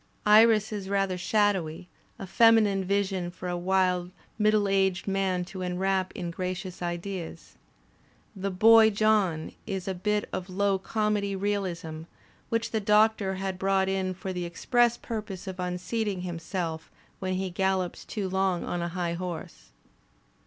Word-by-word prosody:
Iris 215 0 +5
is 195 -2 -5
rather 195 -2 +1
shadowy, 180 -4 0 0.3
a - - -6
feminine 215 -1 +4
vision 190 -2 -1
for 180 +1 -8
a 175 - -2
wise 180 0 +1 0.3
middle 210 -1 +3
aged 190 -2 +1
man 190 -2 0
to 185 +1 -8
enwrap 185 +1 0
in 175 -2 -4
gracious 180 +1 -5
ideas. 175 -1 -5 0.8
The 195 0 -3
"boy 220 +4 +7
John" 200 -6 +1 0.2
is 195 -3 -4
a 190 - 0
bit 210 +3 -1
of 185 +1 -4
low 195 +1 +1
comedy 210 -1 -1
realism, 180 -5 -3 0.4
which 230 0 -1
the 220 - 0
Doctor 210 -1 +3
has 190 -1 -3
brought 190 0 +1
in 190 -1 -1
for 190 +1 -5
the 180 -1 -3
express 240 +7 +2
purpose 210 -5 -6
of 190 -1 -7
unseating 180 +3 -2
himself 170 -2 -4 0.3
when 185 0 -2
he 190 0 -2
gallops 190 -1 -1
too 205 -3 -4
long 190 -1 0
on 175 - -3
a 170 - -1
high 170 -1 -1
horse. 170 - -6
190 Hz, 145 wpm, -27 LUFS, 180-205 Hz, 0.8 s, boy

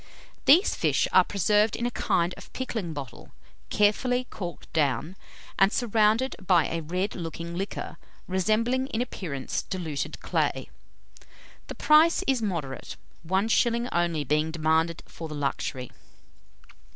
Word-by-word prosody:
These 340 +9 +6
fish - - +1
are - - +7
preserved 210 +3 +2
in 235 - -2
a 245 - -1
kind 175 -5 0
of - - -13
pickling 225 -9 -3
bottle, 140 -5 -8 0.4
carefully 245 +5 +2
corked 175 -4 -7
down, 150 +2 0 0.4
and 195 +1 +5
surrounded 230 +2 +2
by 175 -4 +4
a 165 - -3
red 180 +6 -2
looking 170 0 -6
liquor, 195 +3 -5 0.3
resembling 220 +8 +1
in 225 -5 -3
appearance 155 - -4
diluted 165 -7 -4
clay. - - -1 1.0
The - - -7
price 310 +2 +5
is 265 -3 +1
moderate, 165 -11 -4 0.3
one 190 +5 0
shilling 235 +1 +2
only 170 -3 0
being 150 +3 +1
demanded 160 +1 0
for 165 - -8
the 155 - -7
luxury. 135 -3 -3
185 Hz, 130 wpm, -27 LUFS, 160-225 Hz, 1.0 s, are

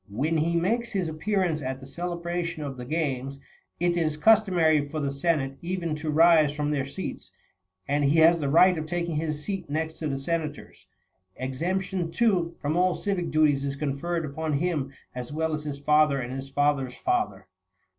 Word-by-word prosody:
When 145 +11 0
he 165 +2 +1
makes 230 +7 0
his 190 -4 0
appearance 175 -1 0
at 130 0 -4
the 135 - -11
celebration 170 +1 -4
of 140 -2 -5
the 125 -1 -7
games,35 140 -2 -2 0.4
it 175 0 +2
is 155 -3 0
customary 170 -7 +4
for 155 +1 -3
the 140 -2 -1
Senate 140 -2 0
even 170 -2 -2
to 155 +1 -4
rise 155 -1 +5
from 150 0 -1
their 140 -3 0
seats, 165 +8 -7 0.6
and 145 +1 +1
he 140 +3 +3
has 165 +1 +6
the 145 -3 -1
right 180 +5 +6
of 155 - -5
taking 170 -1 -2
his 155 -1 -2
seat 195 -4 -4
next 160 +2 -3
to 155 - -2
the 135 -2 -2
senators. 150 +1 -4 0.5
Exemption, 175 +6 -2
too, 180 -6 +1
from 150 +1 -1
all 180 0 +3
civic 185 -5 -2
duties 150 -3 +3
is 140 0 -2
conferred 155 +4 -2
upon 155 +2 -3
him 145 -3 -1 0.2
as 125 0 -6
well 160 +1 -1
as 150 0 -4
his 145 -2 -4
father 150 0 +3
and 125 0 -4
his 135 +1 -6
father's 135 -2 +1
father. 370 0 -1
155 Hz, 185 wpm, -26 LUFS, 140-175 Hz, 0.6 s, has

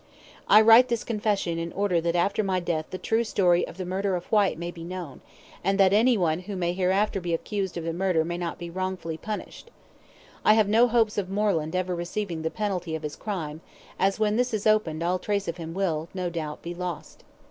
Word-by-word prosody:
I 215 - +8
write 230 +3 +8
this 235 -2 -1
confession 205 -6 -1
in 165 0 -4
order 195 -4 +1
that 170 +1 -1
after 200 +5 +1
my 190 -2 0
death 165 -3 -2
the 185 - -5
true 225 +5 0
story 180 -5 +2
of - - -11
the 185 - -4
murder 190 +1 -1
of 175 - -4
Whyte 205 -6 +3
may 170 +1 -4
be 170 -1 -10
known, 175 -5 -7 0.4
and 195 +2 +1
that 195 -1 +5
any 230 +3 +4
one 165 -3 +1
who 195 +2 -7
may 175 -1 -1
hereafter 190 +2 +1
be 170 -1 0
accused 190 +1 -3
of 170 - -4
the 165 0 -2
murder 175 -2 +1
may 175 +1 -3
not 170 -1 -3
be 170 -1 -7
wrongfully 185 -3 -3
punished. 215 - -7 0.7
I 215 - +6
have 215 -2 +4
no 225 +4 +5
hopes 225 -3 +2
of 190 -2 -4
Moreland 195 -5 0
ever 185 0 -1
receiving 175 0 -3
the 160 - -1
penalty 180 -5 -3
of 160 - -6
his 150 -1 -4
crime, 160 -7 -5 0.4
as 195 +2 +2
when 215 0 +2
this 245 -2 +1
is 205 - -4
opened 195 -7 +2
all 180 +2 0
trace 200 0 -2
of 170 +1 -3
him 165 0 -7
will, 165 -4 -1
no 180 -2 -2
doubt, 155 -3 -5
be 170 - -5
lost. 175 -2 -6
185 Hz, 225 wpm, -26 LUFS, 170-205 Hz, 0.7 s, I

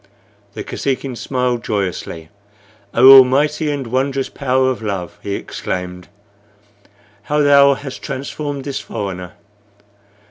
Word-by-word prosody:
The - - -5
Kosekin 135 -1 -3
smiled 125 -1 -2
joyously. 90 -5 -3 0.6
"Oh, 130 +3 +9
almighty 145 +4 +3
and 140 -2 -3
wondrous 135 +3 -1
power 130 -1 +1
of 125 - -5
Love!" 100 -5 -4
he 100 -1 -3
exclaimed, 90 0 -5 1.1
"how 150 +8 0
thou 140 -1 +6
hast 135 -1 -8
transformed 140 +1 -5
this 140 -1 -4
foreigner! 95 -5 -6
130 Hz, 110 wpm, -18 LUFS, 100-140 Hz, 1.1 s, Oh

